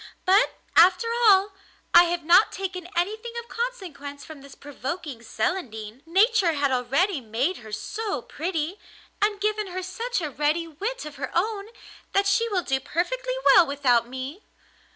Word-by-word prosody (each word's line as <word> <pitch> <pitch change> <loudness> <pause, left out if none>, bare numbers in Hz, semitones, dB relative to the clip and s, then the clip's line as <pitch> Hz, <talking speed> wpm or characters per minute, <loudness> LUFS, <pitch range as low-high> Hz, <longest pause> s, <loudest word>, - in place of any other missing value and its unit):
But, 390 +2 +4 0.2
after 365 +7 +5 0.2
all, 395 0 +5 0.4
I 345 0 +9
have 345 -1 -2
not 350 +6 +5
taken 365 -2 -5
anything 435 +7 -2
of 470 - -10
consequence 360 - -5
from 310 -3 -11
this 280 0 -13
provoking 285 -1 -6
Celandine. 230 - -4
Nature 390 0 +3
had 285 -2 0
already 275 +7 +1
made 245 +11 -1
her 220 -2 -12
so 300 - -4
pretty, 330 +2 -3 0.4
and 415 0 +1
given 425 0 -1
her 370 0 -5
such 460 +6 -3
a 310 -4 -4
ready 300 +5 0
wit 410 +10 -5
of 300 -1 -9
her 265 -1 -4
own, 400 +3 0 0.5
that 395 +1 +3
she 455 +4 +2
will 375 -4 0
do 265 -3 0
perfectly - - -2
well 355 -3 +7
without 255 -4 +2
me. 260 - -6
345 Hz, 155 wpm, -25 LUFS, 280-400 Hz, 0.5 s, I